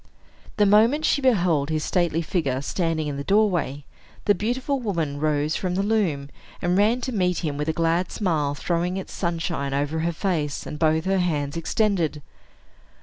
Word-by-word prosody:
The 210 - +4
moment 225 +10 +4
she 285 - +2
beheld 175 - +2
his 155 -1 -1
stately 170 -3 0
figure 145 -6 -1
standing 165 -1 -1
in 145 -2 -3
the 140 - -4
doorway, 175 -8 +1 0.4
the 205 - +5
beautiful 250 +7 -1
woman 165 - -2
rose 150 0 0
from 180 -1 -2
the 195 - +1
loom, 185 -10 0 0.3
and 175 0 0
ran 220 +5 +3
to 260 - -3
meet 180 -5 0
him 145 -2 -2
with 150 +2 -2
a - - +4
glad 165 +2 0
smile 155 -8 0
throwing 175 +4 -1
its 190 - -6
sunshine 165 -5 -2
over 145 +3 -1
her 170 +1 0
face, 160 -4 -2
and 150 - -6
both 160 +1 +2
her 190 0 +2
hands 150 -5 -1
extended. 165 -4 0
170 Hz, 175 wpm, -24 LUFS, 150-195 Hz, 0.4 s, the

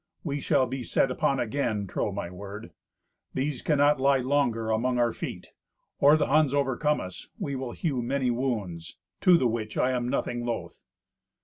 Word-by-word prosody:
We 145 -3 -2
shall 130 - +2
be 130 +2 -4
set 130 +2 +1
upon 135 +1 +1
again; 115 -4 -1
trow 100 +2 -2
my 95 -3 -5
word. 100 +4 -8 0.6
These 135 0 -1
cannot 145 -1 +3
lie 140 0 +4
longer 125 -4 0
among 125 +3 +1
our 120 -1 +2
feet. - - -7 0.5
Or 145 +2 +6
the 150 - +2
Huns 145 -1 +3
overcome 145 +2 +1
us, 90 0 -8
we 140 - -3
will 130 -2 -4
hew 140 -7 -1
many 130 +1 0
wounds; 105 -10 -3 0.2
to 180 -2 +6
the 130 - +1
which 110 -2 -2
I 130 - +2
am 125 -1 -1
nothing 120 -1 -1
loth." 120 -1 -4
125 Hz, 175 wpm, -27 LUFS, 115-140 Hz, 0.6 s, Or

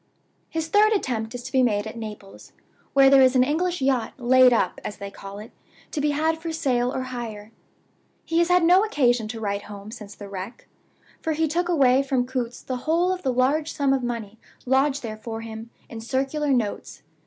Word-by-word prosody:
His 320 -1 -3
third 425 +5 +4
attempt 240 - -2
is 245 - -6
to - - -8
be 260 - +3
made 210 -4 +1
at 220 - -7
Naples, 210 -3 -9 0.4
where 275 -1 +6
there 270 0 +7
is 260 0 +5
an 255 - +6
English 340 +3 -1
yacht 260 -4 +1
'laid 255 0 +5
up,' 235 - 0
as 205 - -6
they 200 0 -7
call 195 0 -10
it, 215 +2 -10 0.4
to 295 - -2
be 295 - +1
had 315 +2 0
for 330 0 -4
sale 255 -6 0
or 260 - -3
hire. 230 -4 -7 0.7
He 330 - +1
has 340 - +3
had 360 -1 +4
no 360 +4 +6
occasion 245 - +1
to 225 +1 -6
write 200 -1 -3
home 205 0 -9
since 210 -2 -10
the 205 - -9
wreck; 195 +4 -8 0.5
for 320 - -1
he 320 +1 +1
took 345 +3 -1
away 270 -6 +4
from 265 -3 0
Coutts's 250 -2 -4
the 255 - -3
whole 345 +3 +3
of 370 0 -3
the 265 - 0
large 275 +5 +1
sum 280 -2 +1
of 270 - 0
money 225 -3 -5 0.3
lodged 270 +2 +2
there 215 -2 -5
for 225 +1 -6
him, 225 0 -8 0.2
in 225 -1 -8
circular 270 +5 -1
notes. 230 -6 -2
255 Hz, 210 wpm, -24 LUFS, 225-300 Hz, 0.7 s, there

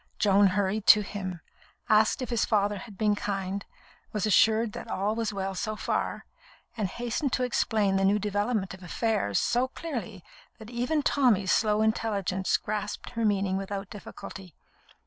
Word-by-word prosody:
Joan 200 -1 +5
hurried 200 +2 -1
to 210 - +9
him, 185 -4 -5 0.5
asked 215 +4 +3
if 250 - -6
his 235 -2 +1
father 205 -2 +1
had 210 -4 -11
been 210 0 +2
kind, 195 -1 -3 0.5
was 210 -1 -1
assured 220 +2 +4
that 240 - -7
all 200 +3 0
was 225 -1 -2
well 195 -1 -3
so 215 +3 -3
far, - - -2 0.5
and 215 -4 -1
hastened 240 +6 -3
to 255 - +1
explain 215 -5 +1
the 195 - +1
new 200 +2 +4
development 205 0 -1
of 190 - -11
affairs 190 - -1
so 245 +2 +1
clearly 240 - -6 0.3
that 220 0 -11
even 250 +6 0
Tommy's 225 -11 +3
slow 215 -1 +3
intelligence 200 -4 0
grasped 210 -1 -4
her 230 -1 -2
meaning 195 -3 +1
without 195 0 -5
difficulty. 190 -4 -10
210 Hz, 160 wpm, -28 LUFS, 195-225 Hz, 0.5 s, to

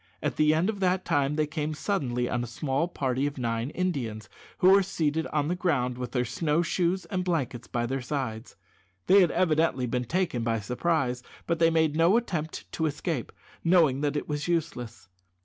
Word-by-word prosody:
At - - -1
the 155 0 +4
end 160 +4 +2
of 215 -2 -2
that 185 0 +1
time 145 0 +1
they 155 0 +2
came 155 0 -3
suddenly 125 -10 -1
on 120 0 -1
a - - -5
small 135 +6 -1
party 135 -4 -1
of 145 - -6
nine 115 0 -1
Indians, 125 - -3 0.3
who 185 - +6
were 200 +1 +7
seated 160 -4 -1
on 150 -1 -1
the 175 - 0
ground 125 -9 0
with 125 -2 -4
their 125 -1 0
snow 150 +6 0
shoes 180 +2 0
and 185 -3 -2
blankets 135 -9 -2
by 120 0 -1
their 135 +2 -2
sides. 125 -4 -4 0.5
They 195 +1 +6
had 175 - +4
evidently 160 -7 +2
been 125 +1 -2
taken 165 -4 -1
by 115 -1 0
surprise, 125 +3 -1 0.2
but 170 -1 -1
they 165 0 +5
made 160 -2 +2
no 170 +7 +5
attempt 165 -10 -3
to 160 - 0
escape, 145 -2 -3 0.3
knowing 165 -6 +4
that 145 0 0
it - - -4
was 150 +1 -3
useless. 145 - -3
150 Hz, 195 wpm, -27 LUFS, 125-170 Hz, 0.5 s, were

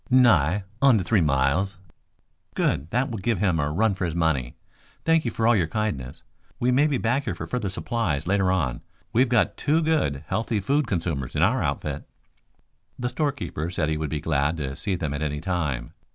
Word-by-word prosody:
"Nigh 105 - +4 0.2
onto 125 -8 +5
three 105 +1 +2
miles." 75 +7 +1 0.8
"Good. 70 +4 0
That 125 +5 0
will 110 - -4
give 110 +2 0
him 90 -4 +1
a 75 -1 0
run 105 +6 +2
for 95 0 -4
his 85 -1 -3
money. 80 -8 0 0.5
Thank 165 -2 +3
you - - +1
for 115 - -1
all 120 +1 +5
your 85 -6 +2
kindness. 80 - -3 0.4
We 125 +1 +2
may 140 +4 +4
be 145 -3 0
back 125 +5 0
here 100 -7 -2
for 80 - -6
further 105 +3 -2
supplies 95 - -2
later 95 0 +2
on. 70 -10 -1 0.3
We've 125 +2 +3
got 120 -3 +2
two 150 +2 +2
good, 145 - +1
healthy 110 -1 -1
food 140 +7 +1
consumers 80 - -2
in - - +2
our - - +3
outfit." - - -3 0.9
The 125 0 -2
storekeeper 140 - -2
said 85 -3 -1
he 80 - 0
would 75 -1 -3
be 75 - -2
glad 75 +1 0
to 70 -3 -4
see 95 +5 -1
them 80 -5 -3
at 75 - -4
any 75 -1 -2
time. 75 -9 -2
95 Hz, 195 wpm, -25 LUFS, 75-120 Hz, 0.9 s, onto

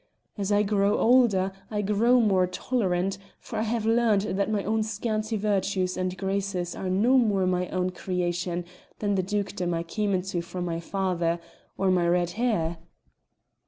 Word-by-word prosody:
As 200 -1 -2
I 205 0 +4
grow 200 0 +2
older 225 -6 +4 0.2
I 210 -1 -1
grow 225 +5 +3
more 190 -5 +3
tolerant, 195 -3 -1 0.2
for - - -7
I - - +1
have 225 0 -1
learned 225 -3 +3
that 200 0 -1
my 210 -2 0
own 220 +1 0
scanty 215 0 -2
virtues 195 -3 0
and 185 0 -2
graces 190 -2 -2
are 185 - -4
no 230 +8 +4
more 205 -5 +2
my 180 -1 0
own 185 0 -1
creation 175 -1 -2 0.3
than 205 -1 0
the 190 - +2
dukedom 185 -3 -2
I 165 - -2
came 200 +3 -1
into 180 -1 -2
from 175 +1 -5
my 165 -1 -2
father 175 -2 -1 0.4
or 190 -1 +2
my 175 -2 +2
red 175 0 +2
hair." 190 -8 -1
195 Hz, 165 wpm, -26 LUFS, 180-215 Hz, 0.4 s, I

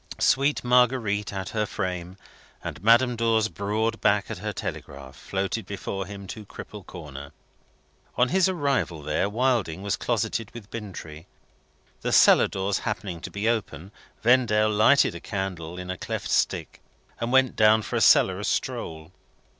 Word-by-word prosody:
Sweet 140 +2 +2
Marguerite 120 -4 +2
at 95 0 -5
her 105 -1 -1
frame, 90 0 -4 0.5
and 85 - -7
Madame 120 +3 +5
Dor's 115 -1 +2
broad 110 +3 -2
back 100 0 +2
at - - -5
her - - -3
telegraph, 70 -1 -7
floated 95 +4 -3
before 95 -1 -5
him 100 -1 -8
to 110 +2 -8
Cripple 105 0 -10
Corner. 70 -6 -10 0.8
On 125 0 +3
his 190 0 +3
arrival 140 - -1
there, 75 +6 0
Wilding 110 -6 0
was 100 0 0
closeted 115 -1 -2
with 110 -3 -10
Bintrey. 90 -7 -8 0.7
The - - -2
cellar - - +6
doors 95 +1 -2
happening 100 -6 -4
to - - -6
be 100 +2 -3
open, 100 -6 -2 0.3
Vendale 110 -3 +4
lighted 110 +5 +4
a 85 - -7
candle 90 -4 -4
in 90 0 -5
a 95 - -6
cleft - - -4
stick, - - 0 0.4
and 115 +1 -2
went 130 -1 +4
down 110 0 +5
for - - -5
a - - +1
cellarous - - +4
stroll. 80 +1 -3
105 Hz, 155 wpm, -25 LUFS, 95-115 Hz, 0.8 s, cellar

